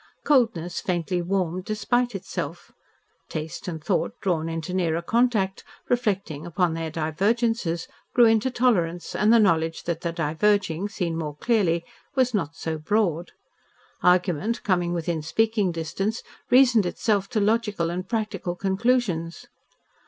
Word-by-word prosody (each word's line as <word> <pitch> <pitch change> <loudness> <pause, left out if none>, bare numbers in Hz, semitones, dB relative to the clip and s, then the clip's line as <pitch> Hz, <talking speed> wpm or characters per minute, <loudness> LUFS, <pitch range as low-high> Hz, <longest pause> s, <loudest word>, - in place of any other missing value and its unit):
Coldness 220 - +2
faintly 175 0 -1
warmed 185 0 -1
despite 240 +2 0
itself, 195 - -5 0.6
taste 155 +2 -5
and 160 -4 -5
thought 205 +6 -1
drawn 165 -4 -1
into 165 +2 -4
nearer 170 -3 +1
contact, 215 -3 +1 0.3
reflecting 200 - -1
upon 175 0 0
their 165 0 -3
divergences, 180 +3 0 0.3
grew 240 - +7
into 225 +2 +3
tolerance 185 -10 +1
and 210 +3 +3
the 235 - +7
knowledge 165 -6 +2
that 170 -1 -3
the 170 - -2
diverging, 170 +3 +1
seen 175 -6 -2
more 155 -3 -4
clearly, 170 -4 +1 0.3
was 255 -2 +2
not 165 -6 -1
so 160 -1 -4
broad; 175 -1 0 0.7
argument 180 +4 +2
coming 180 -3 +1
within 170 -1 -2
speaking 210 +4 +1
distance 195 +7 -3 0.3
reasoned 245 -6 +5
itself 200 +1 0
to 215 - 0
logical 210 -5 +1
and 180 +2 -5
practical 215 -6 -2
conclusions. 190 -4 0
185 Hz, 130 wpm, -25 LUFS, 165-220 Hz, 0.7 s, grew